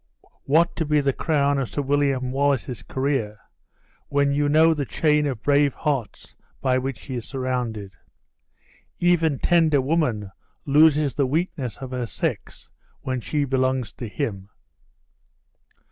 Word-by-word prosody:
what 160 +5 +3
to 165 - -1
be 150 -1 +2
the 140 -1 +1
crown 145 -2 +1
of 130 - -2
Sir 145 - -3
William 135 -2 0
Wallace's 135 -3 0
career, 130 -6 -2 0.7
when 140 0 +2
you 145 +1 +1
know 160 +2 +5
the 150 -2 -2
chain 150 +2 +1
of 125 -6 -4
brave 145 -1 +3
hearts 140 -9 -3 0.3
by 130 -1 +1
which 130 -2 -5
he 135 - -8
is 120 -2 -5
surrounded? 125 -6 -3 1.1
Even 165 -4 +2
tender 160 -3 +3
woman 130 -9 0 0.3
loses 150 0 +4
the 140 -3 +1
weakness 145 - -2
of 130 -2 -8
her 125 -2 -3
sex - - -4 0.3
when 130 -1 -3
she 145 +4 -1
belongs 130 -2 0
to 120 - -7
him." 105 -5 -4
140 Hz, 140 wpm, -23 LUFS, 130-150 Hz, 1.1 s, know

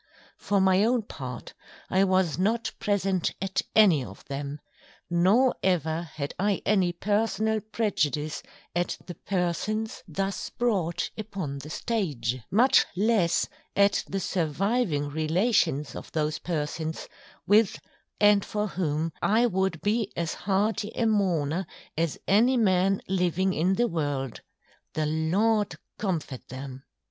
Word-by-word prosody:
For 200 -1 +1
my 190 +1 +4
own 235 +1 +2
part, 130 - -7 0.3
I 190 +1 +3
was 185 -4 +1
not 225 +5 +1
present 195 -3 0
at 195 0 -1
any 185 -11 +6
of 95 -4 -11
them; 140 +1 -5 0.5
nor 200 +10 +4
ever 165 -2 0
had 140 -2 -4
I 200 +1 +1
any 190 -4 +3
Personal 215 +3 0
prejudice 150 - 0 0.3
at 175 0 0
the 175 - -6
Persons 195 +5 -2
thus 195 +4 -3
brought 180 -8 -1
upon 190 -10 -4
the 145 +3 -9
Stage; 145 - -2
much 245 +7 +5
less 205 -4 +2 0.3
at 200 0 +3
the 195 - -2
Surviving 175 -1 0
Relations 160 - +1
of - - -8
those 155 -1 0
Persons, 160 -1 -3 0.4
with 210 +1 +4 0.4
and 205 -1 +5
for 210 0 -2
whom 165 -3 -1
I 225 +4 +3
would 190 -6 0
be 210 0 0
as 170 -2 -1
hearty 205 +3 0
a 235 - +1
Mourner 180 -6 +1 0.3
as 165 -1 -1
any 235 +6 +4
Man 195 -3 +2
living 185 0 +1
in 180 +4 +2
the 240 +3 +2
World: 145 - -2 0.5
_The 155 +1 0
Lord 215 +2 +2 0.2
Comfort 165 - -3
them! 130 +1 -8
185 Hz, 130 wpm, -27 LUFS, 155-210 Hz, 0.5 s, any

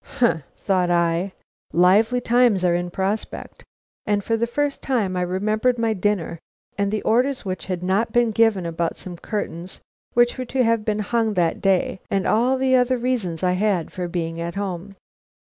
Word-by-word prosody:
"Humph!" 235 -10 +2 0.2
thought 185 -3 +1
I, 170 +2 +1 0.4
"lively 205 +8 +4
times 240 -6 +3
are 175 - +3
in 175 0 -1
prospect," 195 +4 -4 0.4
and 205 -1 0
for 225 - 0
the 235 +1 0
first 290 +4 -1
time 215 -9 0
I 180 - 0
remembered 215 +7 0
my 230 -1 +1
dinner 190 -4 -1 0.4
and 200 0 0
the 215 - -2
orders 255 +3 +1
which 185 -1 -4
had 180 -2 -3
not 200 +5 +1
been 240 -1 +2
given 215 -4 +2
about 165 0 -2
some 180 -2 -8
curtains 180 -3 -5 0.4
which 240 +2 +3
were 255 - -2
to 255 +1 0
have 230 -2 +2
been 210 -1 -1
hung 225 -2 0
that 170 -2 +1
day, 190 -1 +1
and 195 -1 0
all 245 +5 +2
the 260 0 +3
other 255 0 +3
reasons 230 -9 -2
I 180 - +3
had 185 -2 0
for 180 -1 -4
being 165 -1 -3
at 170 +1 -4
home. 195 0 -4
200 Hz, 180 wpm, -22 LUFS, 180-235 Hz, 0.4 s, lively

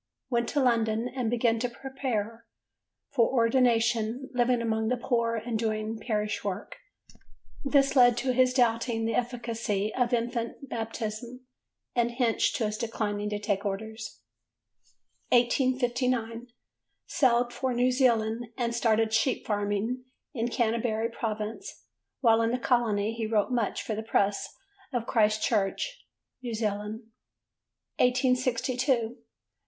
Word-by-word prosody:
Went 235 -1 +1
to 290 - 0
London 230 -3 +2
and 250 -3 -2
began 230 -1 +2
to 245 +1 -1
prepare 235 -3 -4 0.6
for 235 -5 +3
ordination, 235 0 +2
living 245 0 +2
among 220 -1 0
the 250 +2 +1
poor 235 -1 0
and 225 0 -2
doing 220 0 -2
parish 210 -2 -2
work: 200 - -4 0.9
this 275 0 +3
led 245 -2 +6
to 255 +1 0
his 255 0 +4
doubting 230 -2 +1
the 225 - 0
efficacy 230 -4 -2
of 245 -1 +1
infant 240 +2 -2
baptism 230 +2 -5 0.5
and 240 -1 +1
hence 240 -2 +2
to 230 - 0
his 215 0 -3
declining 210 -3 -2
to 210 - -2
take 205 -1 -1
orders. 220 +2 -5 1.1
1859. 245 -1 +1 0.6
Sailed 245 -2 +2
for 255 +2 -1
New 245 +1 +2
Zealand 235 -3 +2
and 235 -2 -1
started 225 -2 +2
sheep 250 +3 +1
farming 205 +4 -1 0.3
in 235 -3 -1
Canterbury 230 -1 0
Province: 220 -1 -5 0.4
while 230 -3 +5
in 225 - +2
the 245 - 0
colony 225 -4 +1
he 225 -1 -3
wrote 215 +1 +1
much 235 -4 -1
for 220 - -3
the 215 - -3
Press 205 -2 0 0.3
of 245 -3 -2
Christchurch, 215 - +1 0.4
N.Z. 230 -2 -2
1862. 240 +4 -2 0.3
Dec. 240 -3 +1
230 Hz, 125 wpm, -28 LUFS, 220-245 Hz, 1.1 s, led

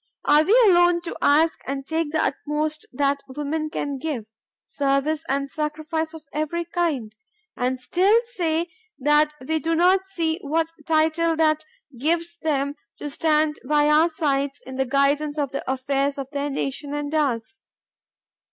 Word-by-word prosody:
Are 295 +1 +6
we 415 +10 +4
alone 350 -2 +5
to 335 - -6
ask 315 +3 +3
and 275 0 -3
take 320 0 -1
the 315 - +1
utmost 305 +1 -2
that 280 +2 0
women 295 +3 -3
can 285 -3 -3
give,—service 275 +3 -3
and 275 0 -1
sacrifice 315 +1 -3
of 320 - -10
every 310 +3 -2
kind,—and 275 - -3
still 380 - +3
say 340 -8 -2 0.3
that 295 +2 +3
we 320 0 +1
do 325 +1 0
not 370 +3 +3
see 330 -3 -1
what 320 +3 0 0.2
title 320 +1 +2
that 310 -1 +2 0.3
gives 335 +4 0
them 285 -2 -1 0.2
to 295 - -5
stand 305 0 +1
by 295 +2 +3
our 310 +3 +5
sides 280 -3 -1
in 260 0 -7
the 265 - +1
guidance 280 +3 +1
of 285 -3 -1
the 275 - -4
affairs 275 +2 -1
of 275 0 -6
their 285 -1 -2
nation 280 +1 -3
and 295 0 -3
ours? 260 -4 -1
300 Hz, 150 wpm, -23 LUFS, 280-325 Hz, 0.3 s, Are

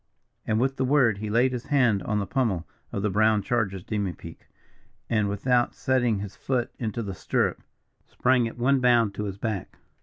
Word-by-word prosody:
And 110 0 +1
with 135 +2 0
the 130 - 0
word, 125 -6 +3
he 105 0 -4
laid 120 +4 +3
his 125 -2 -5
hand 125 -9 +3
on 105 +3 -1
the 100 - -1
pummel 100 -9 -1 0.2
of 100 - -3
the 105 - +1
brown 110 0 +3
charger's 100 -5 -1
demipique, 100 -4 -5 0.6
and, 105 -3 +2
without 120 +4 +1
setting 125 -4 +1
his 100 -1 -7
foot 125 -3 -2
into 115 0 -3
the 100 -2 -5
stirrup, - - -1 0.5
sprang 125 -2 +2
at 115 - -9
one 135 +3 +3
bound 120 -4 +4
to 105 +2 -4
his 100 -1 -5
back. 105 -3 -4
110 Hz, 185 wpm, -26 LUFS, 100-125 Hz, 0.6 s, bound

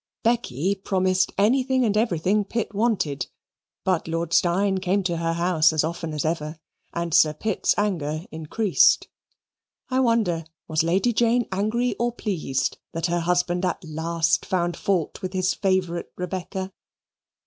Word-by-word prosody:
Becky 200 - +1
promised 185 -1 +1
anything 255 +4 +3
and 210 -2 +1
everything 205 -1 +1
Pitt 215 +1 -3
wanted; 200 -10 0 0.6
but 185 -4 0
Lord 165 0 -2
Steyne 190 +3 +2
came 190 +2 0
to 175 -2 -1
her 165 0 0
house 170 -2 +3
as 155 -1 +1
often 165 0 -3
as 150 - -2
ever, 155 -1 -2 0.3
and 170 -1 -3
Sir 155 -1 +5
Pitt's 215 +5 0
anger 165 -6 -1
increased. 160 +6 +2 0.8
I 260 - +2
wonder 220 -10 +1 0.2
was 160 0 +1
Lady 190 +9 +2
Jane 235 +1 +2
angry 215 +6 0
or 240 +1 +1
pleased 180 - -2
that 165 0 -2
her 175 -1 +1
husband 175 +1 0
at 185 - -1
last 165 +1 0
found 175 -2 -1
fault 180 -4 -1
with 185 0 -4
his 185 0 +1
favourite 185 -3 0
Rebecca? 185 +1 -4
180 Hz, 145 wpm, -24 LUFS, 165-205 Hz, 0.8 s, Sir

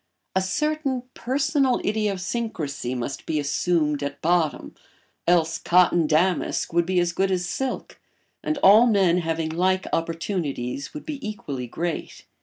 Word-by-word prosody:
A 190 - +3
certain 275 +5 -1
personal 275 0 +1
idiosyncrasy 195 - -2
must 125 +2 -5
be 155 -2 0
assumed 150 0 0
at 140 0 -4
bottom, 165 -2 0 0.5
else 165 -2 +3
cotton 175 -2 +4
damask 170 +3 +1
would 170 0 +2
be 185 -1 +2
as 175 -1 +1
good 195 +2 +1
as 180 -1 0
silk 265 +7 -4 0.4
and 310 - -1
all 215 +5 +8
men 190 -6 +3
having 165 -1 -2
like 185 +3 +1
opportunities 165 - -3
would 300 - -7
be 290 -3 -6
equally 145 -12 -5
great. 170 +7 -4
180 Hz, 135 wpm, -24 LUFS, 160-215 Hz, 0.5 s, all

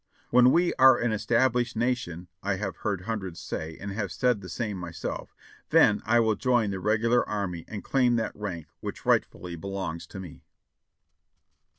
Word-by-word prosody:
"VVhen 125 +1 +7
we 175 +3 +3
are 130 -1 +8
an 120 -1 0
established 120 +3 +1
nation," 110 -8 -2
I 100 0 0
have 95 0 -4
heard 100 -4 -2
hun 110 +3 -2
dreds 95 -4 -7
say, 80 0 -5
and 100 +1 -5
have 100 -1 -3
said 125 -5 +1
the 90 - -9
same 105 +3 -3
myself, 85 -1 -6 0.3
"then 105 - +5
I 120 +1 +5
will 110 -1 +3
join 115 -1 +1
the 95 - -3
Regular 115 +5 +2
Army 95 -5 -3
and 105 -2 -6
claim 125 -3 +2
that 115 -1 -1
rank 95 -7 -5
which - - -7
rightfully 90 -1 0
belongs 85 -2 -5
to 95 - -9
me." 90 -5 -10
105 Hz, 175 wpm, -27 LUFS, 95-120 Hz, 0.3 s, are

